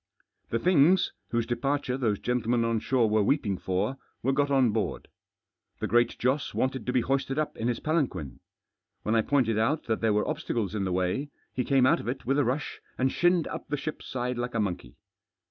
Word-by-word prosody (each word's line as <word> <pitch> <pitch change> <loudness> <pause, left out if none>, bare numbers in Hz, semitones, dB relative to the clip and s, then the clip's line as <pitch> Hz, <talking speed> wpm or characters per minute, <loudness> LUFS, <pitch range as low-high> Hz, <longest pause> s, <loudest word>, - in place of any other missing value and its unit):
The 115 - 0
things, 175 +4 +4 0.2
whose 115 -1 0
departure 135 +2 -1
those 115 -6 0
gentlemen 120 0 0
on 115 -1 +1
shore 125 0 +2
were 110 0 +2
weeping 105 -3 +1
for, 100 +8 -1 0.3
were 135 - +2
got 145 +1 +1
on 135 -4 +4
board. 110 0 -2 0.7
The - - -2
Great 120 0 +2
Joss 130 +4 0
wanted 130 -3 -1
to - - +1
be 125 -1 +2
hoisted 135 +2 -1
up 155 -1 -1
in 115 - -2
his 120 -1 0
palanquin. 125 - -1 0.6
When 110 - 0
I 115 - +4
pointed 115 -4 +1
out 145 +8 +1
that 110 -1 -2
there 115 -1 +3
were 105 0 +1
obstacles 110 -5 -2
in 100 -3 -1
the 95 - -1
way, 90 +11 -1 0.2
he 125 - -1
came 135 0 +3
out - - +4
of - - -7
it 125 +3 -4
with 135 +3 +2
a - - +4
rush 135 +5 -2 0.2
and 130 +1 +1
shinned 175 -1 +3
up - - -6
the 145 - -2
ship's 155 +2 -6
side 125 -1 -2
like 120 0 -3
a - - +1
monkey. 90 - -3
125 Hz, 210 wpm, -28 LUFS, 110-135 Hz, 0.7 s, things